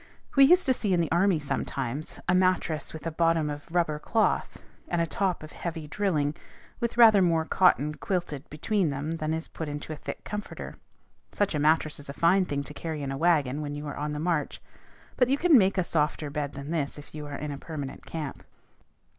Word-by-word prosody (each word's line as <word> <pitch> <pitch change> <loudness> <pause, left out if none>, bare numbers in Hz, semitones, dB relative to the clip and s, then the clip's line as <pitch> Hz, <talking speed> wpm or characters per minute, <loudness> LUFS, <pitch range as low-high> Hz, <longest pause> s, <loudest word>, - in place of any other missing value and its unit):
We 275 -1 +8
used 355 +6 +5
to 260 - +4
see 205 -6 0
in 175 - +3
the 165 - 0
army 180 +1 +3
sometimes, 140 -1 -3
a 180 - +3
mattress 185 -4 +1
with 160 0 -9
a 165 - -1
bottom 165 -2 +2
of 145 +2 -8
rubber 165 -3 0
cloth, 220 +8 0 0.3
and 175 - -1
a 170 - +3
top 180 0 -1
of 155 - -9
heavy 160 -3 -5
drilling, 155 -5 0 0.5
with 235 -1 -2
rather 220 -4 +8
more 165 -3 +2
cotton 150 -5 +3
quilted 165 -5 -3
between 175 +4 0
them 145 +4 -3
than 155 -1 -2
is 160 +1 -3
put 160 -2 -6
into 145 +2 -5
a - - -5
thick - - -7
comforter. 210 0 -6 0.6
Such 205 -3 0
a 150 - 0
mattress 155 0 +2
is 145 - -9
a - - -4
fine 180 +5 +3
thing 140 -4 -2
to - - -9
carry 160 -3 -4
in 135 - -3
a - - -2
wagon 150 -4 +2
when 145 -1 -4
you 145 +1 -6
are 145 - -5
on 150 +1 -3
the 150 - -3
march; 165 -2 -1 0.6
but 250 -1 +3
you 275 - +3
can 340 0 +5
make 195 -4 +5
a 185 - +3
softer 150 -2 -1
bed 145 -1 -3
than 140 +2 -7
this 150 -4 -2
if 145 - -12
you 150 -1 -6
are 145 -1 -5
in 150 -1 -4
a 140 - -6
permanent 145 -4 -7
camp. 155 -4 -5
160 Hz, 220 wpm, -27 LUFS, 145-180 Hz, 0.6 s, We